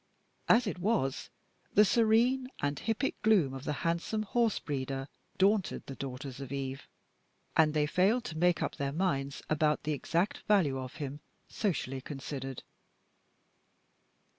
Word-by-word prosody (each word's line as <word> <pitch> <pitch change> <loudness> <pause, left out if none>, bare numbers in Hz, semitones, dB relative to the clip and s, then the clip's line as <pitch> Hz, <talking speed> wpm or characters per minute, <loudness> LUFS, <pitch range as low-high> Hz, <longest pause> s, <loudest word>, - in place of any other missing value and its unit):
As 240 +2 +6
it 200 -3 -3
was, 180 - 0 0.5
the 210 - +8
serene 235 +4 +3
and 145 0 -1
hippic 225 +4 -1
gloom 190 -12 +4
of 135 +1 -7
the - - 0
handsome 170 +6 0
horse 230 +1 +1
breeder 135 -2 -3 0.3
daunted 195 0 +2
the 135 - -7
daughters 135 0 -6
of 135 -1 -7
Eve, 135 -1 -4 0.7
and 155 -1 +4
they 150 -1 +3
failed 195 +10 +2
to 160 - -5
make 175 0 +3
up - - -3
their 140 0 -2
minds 140 -6 -1
about 155 -1 +1
the 150 - 0
exact 170 +7 0
value 165 -11 +3
of 130 +2 -7
him, 145 -2 -5 0.3
socially 135 - -2
considered. 135 -1 -6
155 Hz, 140 wpm, -31 LUFS, 135-205 Hz, 0.7 s, the